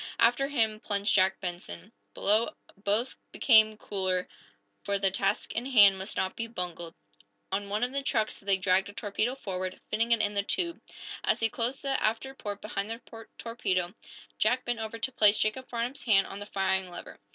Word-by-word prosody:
After 245 +4 +3
him 225 -6 +1
plunged 205 -1 +1
Jack 190 -1 +3
Benson. 175 - -6 0.2
Below, 220 +8 +2 0.2
both 210 +5 0
became 220 -3 +5
cooler, 185 -3 -1 0.6
for 200 0 +1
the 195 -1 +2
task 195 +1 0
in 240 +3 -2
hand 205 -7 +7
must 190 +3 -3
not 190 0 -1
be 230 - -3
bungled. 175 -6 -5 0.6
On 200 +1 -2
one 210 +3 0
of 250 - 0
the 280 +1 -1
trucks 220 -5 0
they 195 -1 +1
dragged 190 +1 +2
a - - -10
torpedo 215 +4 -1
forward, 185 -6 -5
fitting 230 +2 +1
it 230 - +5
in 205 -1 0
the 200 - +1
tube. 340 - -2 0.4
As - - +1
he 225 - +2
closed 240 +4 -2
the 270 -1 0
after 230 +5 0
port 205 -6 -6
behind 205 -1 -3
the 225 0 -9
torpedo, 190 -7 -2 0.5
Jack 245 +4 +2
bent 240 -1 -2
over 220 +1 -4
to 230 +3 -1
place 210 -3 +5
Jacob 255 +4 -1
Farnum's 240 +3 -3
hand 195 -5 +5
on 195 - -7
the 205 - -7
firing 190 -1 0
lever. 175 - -10
210 Hz, 185 wpm, -29 LUFS, 195-230 Hz, 0.6 s, hand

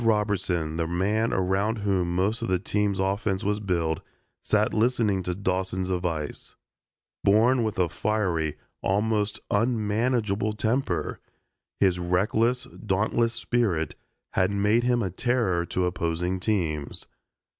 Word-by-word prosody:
Ted 115 - 0
Robertson, 95 -7 +1
the 80 -1 0
man 105 +6 +1
around 95 +4 +1
whom 95 -4 0
most 105 +6 +1
of 115 - -2
the 95 - +2
team's 100 +1 0
offense 95 0 0
was 105 +1 0
built, 85 -5 0 0.4
sat 105 0 +1
listening 110 -4 +2
to 90 0 -3
Dawson's 95 -1 -1
advice. 85 -5 -3 0.7
Born 115 +5 +4
with 110 -1 -2
a 90 -2 +3
fiery, 85 -5 -1 0.2
almost 105 +1 0
unmanageable 110 -1 +1
temper, 115 +6 -1 0.6
his 95 -3 +3
reckless, 110 +8 +1 0.2
dauntless 110 +3 +1
spirit 115 - 0 0.4
had 95 0 +2
made 105 +3 +2
him 120 -1 +2
a 95 - -2
terror 95 -5 0
to 90 - 0
opposing 90 +1 -1
teams. 85 -8 -1
100 Hz, 125 wpm, -26 LUFS, 90-110 Hz, 0.7 s, Born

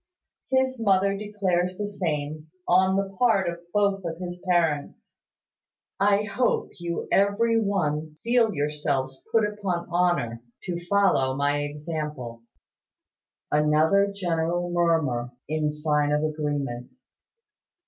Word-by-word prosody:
His 260 -1 +1
mother 195 -2 +3
declares 190 -3 -1
the 210 - -2
same, 155 -6 -3 0.2
on 190 +1 +4
the 195 0 -2
part 220 -7 +3
of 170 0 -3
both 200 -1 +1
of 165 -1 -4
his 175 0 -6
parents. 160 -5 0 0.8
I 200 +1 +3
hope 230 +4 0
you 170 0 -3
will - - -4
every 225 +4 +3
one 155 -7 -1
feel 235 -1 +3
yourselves 145 -4 -2
put 225 -2 +4
upon 195 -5 -3
honour, 175 -10 +1 0.2
to 175 -2 -4
follow 190 -10 +3
my 145 +1 +1
example." 145 -5 -5 1.1
Another 155 +7 +3
general 175 -2 -1
murmur, 155 -9 +1
in 155 0 0
sign 150 -1 0
of 150 +1 +1
agreement. 145 - -3
175 Hz, 115 wpm, -25 LUFS, 150-200 Hz, 1.1 s, on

